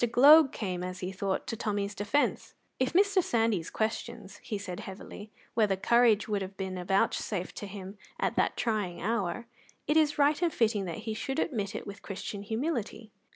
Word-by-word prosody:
Gloag 285 +4 +8
came, 185 -4 -3
as 185 0 -5
he 180 +1 -3
thought, 195 0 -2
to - - -3
Tommy's 205 -2 -2
defence. 205 +9 0 0.2
"If 260 0 +1
Mr. 395 +1 +4
Sandys 225 - 0
questions," 220 -2 -3
he 210 - -5
said 185 -3 -6
heavily, 205 +2 -9 0.2
"whether 210 -4 +3
courage 225 +1 +4
would 205 -2 -1
have 190 0 -6
been 185 -2 -4
vouchsafed 190 0 0
to 205 - -5
him 195 +1 -9 0.2
at - - 0
that - - +1
trying 210 -6 -1
hour, 215 +1 -1 0.4
it 300 - +2
is 300 -2 +3
right 290 +2 +3
and 345 -2 +2
fitting 220 -7 +1
that 185 +6 -6
he 220 - -2
should 270 +5 -3
admit 215 - -1
it - - -5
with 200 0 -8
Christian 200 0 -6
humility." 225 -1 -3
210 Hz, 180 wpm, -30 LUFS, 195-240 Hz, 0.4 s, Gloag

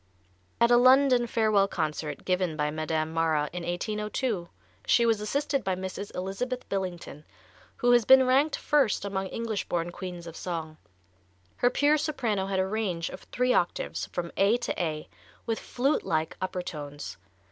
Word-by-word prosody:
At 235 +1 +4
a 240 - +7
London 255 -1 +5
farewell 215 -4 +3
concert 150 -4 -3
given 180 -4 0
by 150 0 0
Madame 155 0 -2
Mara 160 -2 +1
in 180 - -4
1802, 210 +2 -2 0.4
she 235 - +4
was 225 -2 +2
assisted 275 +5 -1
by 190 -2 0
Mrs. 190 +2 -5
Elizabeth 220 +8 -3
Billington, 180 -6 -4 0.5
who 245 - +3
has 240 -1 +6
been 265 +3 +7
ranked 275 +4 +3
first 270 -9 +1
among 190 -1 -2
English 225 -1 -3
born 175 0 -1
queens 175 -2 -7
of 165 -1 -9
song. 160 -3 -5 0.8
Her 245 - +3
pure 295 +3 +3
soprano 235 -11 -1
had 195 -1 -1
a 190 - +2
range 190 -5 -2
of - - -8
three 250 0 +2
octaves, 175 - -1
from 170 -1 -4
A 205 +4 +4
to 215 - -2
A, 155 -2 -3 0.4
with 225 -1 -1
flute 275 +5 0
like 160 0 -1
upper 185 -1 -3
tones. 145 - -7
195 Hz, 160 wpm, -28 LUFS, 170-240 Hz, 0.8 s, a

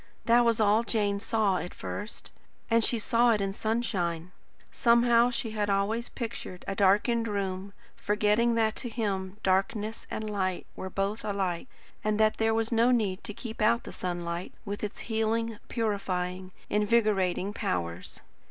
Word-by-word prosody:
That 240 +1 +5
was 230 -1 +2
all 215 +1 +4
Jane 205 -3 0
saw 210 -3 +1
at 180 - -5
first, 210 +2 -6 0.4
and 230 0 +4
she 235 - +2
saw 235 +1 +3
it 215 - 0
in 195 -1 -1
sunshine. 185 -7 -1 0.4
Somehow 235 0 +4
she 235 -2 -3
had 210 -1 -1
always 205 +4 0
pictured 220 -6 -6
a 195 - -1
darkened 210 +4 +3
room, 195 -2 -3 0.3
forgetting 210 +3 +2
that 220 -1 +2
to 240 - -3
him 200 -4 -2
darkness 200 +3 0
and 215 - -4
light 190 -3 -1
were 190 - -5
both 200 +3 -2
alike, 195 -1 -2 0.4
and 215 0 0
that 215 0 +3
there 225 0 +2
was 225 +1 0
no 230 +1 +4
need 210 -7 +1
to 210 - -2
keep 225 -2 -7
out 235 +2 +3
the - - -8
sunlight, 175 -1 -4
with 205 0 -5
its 210 - -4
healing, 225 0 -1
purifying, 185 -4 -2 0.2
invigorating 205 -3 +2
powers. 85 - -3
210 Hz, 155 wpm, -29 LUFS, 195-230 Hz, 0.4 s, That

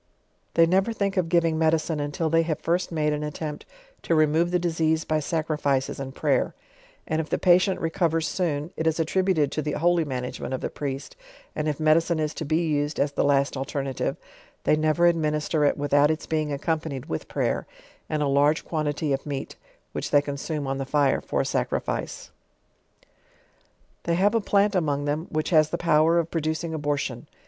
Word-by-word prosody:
They 165 - +6
never 190 +6 +2
think 200 -2 -1
of 180 -3 0
giving 165 -2 +2
medicine, 160 -1 +1
until 145 +3 -2
they 165 +1 +3
have 160 -2 -1
first 175 +2 -1
made 150 -2 +1
an 150 - -2
attempt 150 0 -5 0.3
to 165 - +1
remove 155 +2 +3
the 180 - +2
disease 160 -2 0
by 155 0 +1
sacrifices 150 -4 -1
end 135 0 -6
prayer; - - +1 0.5
and 160 0 0
if 155 - -8
the - - +1
patient 185 +1 +3
recovers 165 -1 0
eoon, 155 -2 -2
it 160 - -1
is 160 +1 +1
attributed 165 -2 +1
to; 155 - -2
the 150 0 -3
holy 175 +1 +2
management 130 -2 -4
of - - -6
the - - -3
priest; 140 - -5 0.4
and 155 0 -2
if 150 -1 -2
medicine 160 +2 +3
is 155 0 -1
to 160 - -5
be 160 +3 +1
used 145 0 -1
as 140 0 +1
the - - 0
last 140 0 +2
alternative, 135 -1 -3 0.5
they - - +4
never 155 +2 +2
administer 155 -2 +1
it - - +2
without 145 0 +3
its 155 0 -2
being 155 -2 -1
accompanied 150 -2 -2
with 80 - -4
prayer, - - -1 0.4
nnd 150 -1 0
a - - +1
largo 145 +3 +3
quantity 150 -2 -1
of 135 - -2
meat, 140 -2 -4 0.4
which - - -4
they 145 - +5
consume 145 +1 -4
on 135 0 -2
the - - -1
fire 145 -1 +2
for - - -1
a - - -2
sacrifice. - - -2 1.7
They 170 - +1
have 200 +5 +3
a 230 - +2
plant 200 0 +2
among 145 -6 0
them, 150 +4 -2
which 155 +2 -2
has 155 -2 +5
the 170 - -2
power 165 0 +3
of 165 -1 0
producing 160 0 -2
abortion. 145 -3 -2
155 Hz, 190 wpm, -25 LUFS, 145-165 Hz, 1.7 s, They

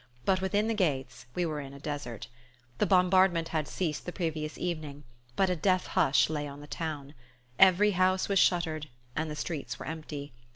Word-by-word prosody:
But 185 -1 +2
within 205 +3 +1
the 225 - +1
gates 135 - -1
we 180 - +1
were 155 -2 -2
in 135 0 -9
a - - -10
desert. 145 -7 -5 0.5
The - - +3
bombardment 185 -2 +4
had 155 -3 -1
ceased 160 -6 -2
the - - -2
previous 160 -4 -3
evening, 155 -5 -4 0.3
but 190 -1 +2
a - - +1
death 185 +2 +2
hush 135 - +3
lay 150 -2 -3
on 140 0 -9
the 145 - -10
town, 150 -2 -5 0.5
Every 195 +2 +6
house 185 0 +2
was 195 -1 +3
shuttered 160 -5 +2 0.3
and 160 0 -1
the 150 - -4
streets 145 -6 -4
were - - -8
empty. 150 -2 -6
160 Hz, 190 wpm, -30 LUFS, 145-185 Hz, 0.5 s, Every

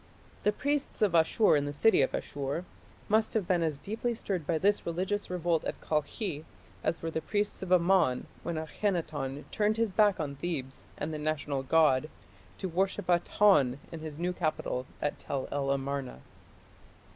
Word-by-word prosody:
The 210 - +3
priests 285 0 -1
of 200 -5 +3
Ashur 170 +4 +4
in 145 -1 +1
the 145 - -2
city 220 +4 +4
of 135 - +2
Asshur 140 +5 -3 0.4
must 220 +1 +2
have 205 -5 +1
been 180 -2 +2
as 155 -3 0
deeply 225 +8 -2
stirred 185 -8 -3
by 165 - +2
this 205 +5 +2
religious 185 +5 -2
revolt 175 -2 0
at - - -3
Kalkhi 155 +2 -2 0.4
as 165 - -1
were 165 - -2
the 160 - -2
priests 205 +3 -1
of 190 -1 -5
Amon 175 -7 +4 0.2
when 170 - -3
Akhenaton 155 -5 -2
turned 215 0 +1
his 225 -4 +1
back 205 -1 +4
on 140 -3 -3
Thebes 135 -6 -4
and 155 +2 -3
the 155 - -4
national 150 -2 -1
god 150 0 +3 0.5
to 190 - -3
worship 185 +2 -1
Aton 175 -7 +4
in 165 - -6
his 155 -2 -7
new 175 +2 -1
capital 155 -6 -2 0.2
at 145 - -1
Tell 135 -2 -3
el 140 -1 -1
Amarna. 135 - -2
165 Hz, 170 wpm, -30 LUFS, 145-195 Hz, 0.5 s, Ashur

